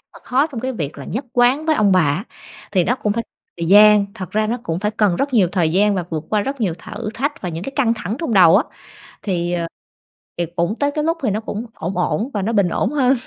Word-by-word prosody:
mà - - -14
khó 270 +4 +2
trong 260 -8 -7
cái 260 +1 -2
việc 155 - -5
là - - -7
nhất 250 +6 -4
quán 255 +5 +3
với 315 - +3
ông 205 -2 +3
bà 185 - +5
á. 160 +6 0 0.5
Thì 180 -4 +3
nó 245 - +1
cũng 210 -4 -1
phải 230 +1 -2 0.4
thời 165 - -2
gian, 210 0 +7
thật 185 -3 -7
ra 215 0 +1
nó 235 +3 -1
cũng 165 +1 -3
phải 210 +2 -1
cần 210 -5 +1
rất 275 -1 -1
nhiều 190 -6 +4
thời 165 -4 +1
gian 205 +2 +3
và 180 -3 -2
vượt 155 -1 -3
qua 210 -1 +2
rất 275 +1 -4
nhiều 180 -7 0
thử 215 -2 -6
thách 285 +4 -2
và 180 - -2
những 165 +2 -5
cái 270 - -5
căng 245 -5 +3
thẳng 215 +2 -4
trong 325 -9 -3
đầu 180 -2 +7
á, 245 - +3 0.6
thì, 175 -3 -1
ờ, 170 -1 -1 0.7
thì 175 - 0
cũng 170 +5 0
tới 285 0 +1
cái 300 0 -2
lúc 330 +1 0
thì 235 - +2
nó 210 +2 -1
cũng 220 +1 -5
ổn 175 +5 -5
ổn 230 +6 0
và 205 - -1
nó 225 +4 -1
bình 200 -4 +3
ổn - - 0
hơn. 265 -3 +3
210 Hz, 270 wpm, -19 LUFS, 180-245 Hz, 0.7 s, gian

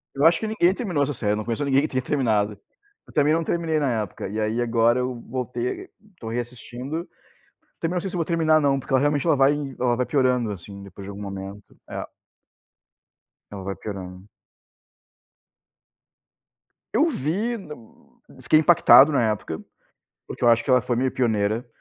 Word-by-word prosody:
Eu 140 - +2
acho 165 0 +5
que 220 - -3
ninguém 190 -4 +2
terminou 180 - -1
essa 145 +1 -2
série, 105 -4 -1
eu - - +1
não 110 - -4
conheço 120 +5 -2
ninguém 135 0 +3
que - - 0
tenha 130 -1 -2
terminado. 110 -7 0 0.5
Eu - - -16
também 150 +1 +3
não 165 0 +1
terminei 160 -2 0
na 125 -6 0
época, 95 - -7
e 105 +3 -4
aí 110 +3 0
agora 120 +1 +2
eu 125 -1 -3
voltei, 125 -1 -4 0.3
tô 110 - -6
reassistindo. 125 +6 -5 0.7
Também 170 +2 -2
não 175 - 0
sei 195 - -4
se 180 - -7
eu - - -1
vou 165 - 0
terminar 160 -1 +3
não, 135 -1 +2
porque 135 - -6
ela 130 - +5
realmente 145 0 +1
ela 160 - +4
vai 135 +2 +4 0.3
ela 120 -1 +2
vai 125 - 0
piorando, 125 -4 +1
assim, 100 +1 -9
depois 100 0 -11
de - - -8
algum 100 +1 -8
momento. 100 0 -8
É. - - -5 1.5
Ela 100 -2 -7
vai 95 0 -4
piorando. 95 -1 -8 2.6
Eu 320 - +4
vi, 210 - -1
hã, 170 -8 -8 0.7
fiquei 155 - +4
impactado 155 -3 +7
na 130 -5 +2
época, 80 -6 -5 0.7
porque - - -9
eu 120 - +5
acho 115 0 +4
que 135 - -2
ela 125 0 +6
foi 120 0 -2
meio 130 +1 0
pioneira 110 -1 0
125 Hz, 185 wpm, -24 LUFS, 110-150 Hz, 2.6 s, impactado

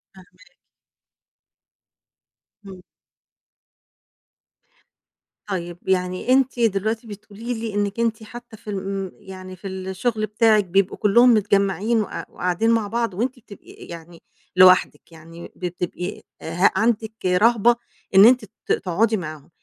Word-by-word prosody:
فاهماكِ. 185 0 -19 2.2
امم. 190 -2 -11 2.7
طيب 175 -3 -4
يعني 185 +3 -1
أنتِ 260 -1 +2
دلوقتي 220 +1 0
بتقول 210 0 -12
لي 230 -2 -4
إنِك 205 +1 -2
أنتِ 225 -1 -1
حتى 240 +1 -11
في 210 - -12
ال 200 - -3
امم 195 -1 -4
يعني 185 -1 -11
في 190 +2 -9
الشغل 190 +4 -3
بتاعِك، 215 0 +3
بيبقوا 195 +2 +1
كلهم 235 +4 +5
متجمعين، 200 +1 +1
وق 210 - -5
قاعدين 180 +5 -1
مع 225 -2 +1
بعض، 230 -1 -2
وأنتِ 245 +7 -3
بتبقي 205 -3 -15
يعني 170 0 -12 0.3
لوحدِك، 185 -1 +4
يعني 165 +1 -12
بتبقي 180 +1 -5 0.2
ه 175 +4 +2
عندِك 220 -1 0
رهبة 225 +5 +4 0.4
إن 195 +2 +9
أنتِ 245 -1 +5
ت 215 +2 -9
تقعدي 215 +4 +1
معاهم، 155 -5 -8
200 Hz, 120 wpm, -22 LUFS, 185-225 Hz, 2.7 s, إن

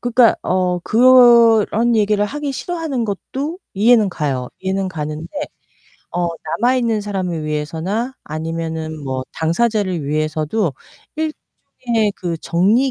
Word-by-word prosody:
그니까 245 -1 +4
어, 180 -1 0
그런 235 -1 +5
얘기를 210 -1 +2
하기 285 +4 -4
싫어하는 315 -6 -3
것도 275 - -4 0.2
이해는 220 0 +4
가요. 135 -7 -2
이해는 190 0 -1
가는데 155 -2 -5 0.8
어 175 0 -1 0.3
남아있는 240 -2 +2
사람을 185 -6 -3
위해서나 165 - -3
아니면은 160 0 -4
뭐 130 -1 -3
당사자를 185 -1 0
위해서도 155 +4 -1 0.4
일종의 240 -8 -3
그 170 -2 -3
정리 210 +12 +2
200 Hz, 275 characters per minute, -19 LUFS, 160-235 Hz, 0.8 s, 그런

